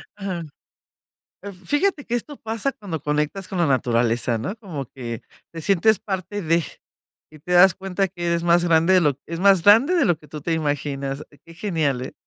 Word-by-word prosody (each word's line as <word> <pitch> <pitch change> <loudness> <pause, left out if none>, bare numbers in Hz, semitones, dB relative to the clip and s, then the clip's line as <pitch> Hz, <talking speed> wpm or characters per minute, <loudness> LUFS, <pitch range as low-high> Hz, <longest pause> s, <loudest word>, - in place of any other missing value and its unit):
Ajá. 195 -4 -4 1.0
Eh, 200 0 -7
fíjate 290 - -1
que 240 - -2
esto 280 +5 -4
pasa 225 +4 -2
cuando 185 - -6
conectas 150 +6 -2
con 190 - -4
la 170 - +3
naturaleza, 120 -3 +1
¿no?, 155 - -4
como 180 -11 -6
que 120 -3 -7 0.3
te 165 - -7
sientes 195 +5 +3
parte 190 +1 -4
de 165 0 +2 0.7
y 155 - -13
te 180 - -5
das 180 +1 +7
cuenta 195 0 -2
que 175 -1 -6
eres 170 0 0
más 175 0 +4
grande 165 +1 +3
de 185 - +6
lo 145 -5 +1
es 165 +1 -5
más 195 -3 +5
grande 230 - +6
de 340 - +3
lo 175 - +2
que 150 - -18
tú 150 - -8
te 165 - -1
imaginas. 145 -2 -2 0.2
Qué 165 - -14
genial, 160 -9 -1
¿eh? 130 - -7
170 Hz, 195 wpm, -22 LUFS, 150-195 Hz, 1.0 s, das